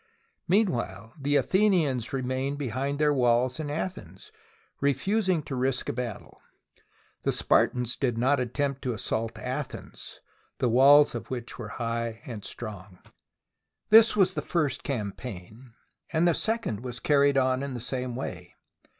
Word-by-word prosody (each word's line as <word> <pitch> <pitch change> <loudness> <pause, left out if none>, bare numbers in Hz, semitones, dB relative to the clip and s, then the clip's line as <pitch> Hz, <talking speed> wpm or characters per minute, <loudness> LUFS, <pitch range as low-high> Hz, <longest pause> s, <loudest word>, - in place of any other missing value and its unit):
Meanwhile, 120 - 0
the 145 +1 +1
Athenians 165 - +2
remained 130 +1 -2
behind 135 +1 -2
their 150 0 +3
walls 125 +1 +2
in 150 -2 -3
Athens, 185 - -6 0.5
refusing 180 - +1
to 140 - -7
risk 130 0 -1
a - - -1
battle. 120 -3 -6 0.8
The - - +1
Spartans 125 -1 +1
did 120 -4 0
not 135 +4 +2
attempt 135 +2 -2
to 125 -3 -2
assault 110 +1 -3
Athens, - - -6 0.4
the 125 - +1
walls 140 +5 +6
of - - -6
which 125 -2 -6
were 115 - -5
high 115 -1 -2
and 115 -7 -7
strong. 100 -5 -8 0.9
This 225 +1 +7
was 190 -2 +3
the - - -2
first 150 -6 -1
campaign, 110 -1 -6 0.4
and 165 +2 +3
the 170 - +4
second 220 - -1
was 125 -1 -5
carried 140 -1 +3
on 130 0 +2
in 140 -2 -4
the - - -4
same 125 0 -4
way. 90 -8 -6
130 Hz, 140 wpm, -27 LUFS, 120-145 Hz, 0.9 s, This